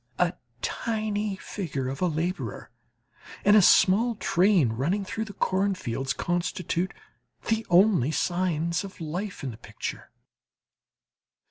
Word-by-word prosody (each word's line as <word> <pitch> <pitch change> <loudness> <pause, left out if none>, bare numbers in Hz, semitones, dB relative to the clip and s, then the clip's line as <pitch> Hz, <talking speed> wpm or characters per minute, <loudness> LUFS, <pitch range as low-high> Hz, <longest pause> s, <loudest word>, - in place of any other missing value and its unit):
A 180 0 +2 0.3
tiny 215 -2 -1
figure 160 -9 -4
of 135 +4 -5
a 180 - +3
labourer 170 +3 -3 0.7
and 205 - +7
a 215 - +8
small 220 +6 +5
train 180 - +3
running 160 - -1
through 220 +3 -3
the 205 - -9
cornfields, 185 -12 -1
constitute 175 +3 -1 0.6
the 225 0 0
only 180 - +5
signs 170 0 0
of 195 0 -10
life 175 +4 -5
in 130 - -3
the 110 - -11
picture. - - -7
180 Hz, 120 wpm, -27 LUFS, 160-205 Hz, 0.7 s, a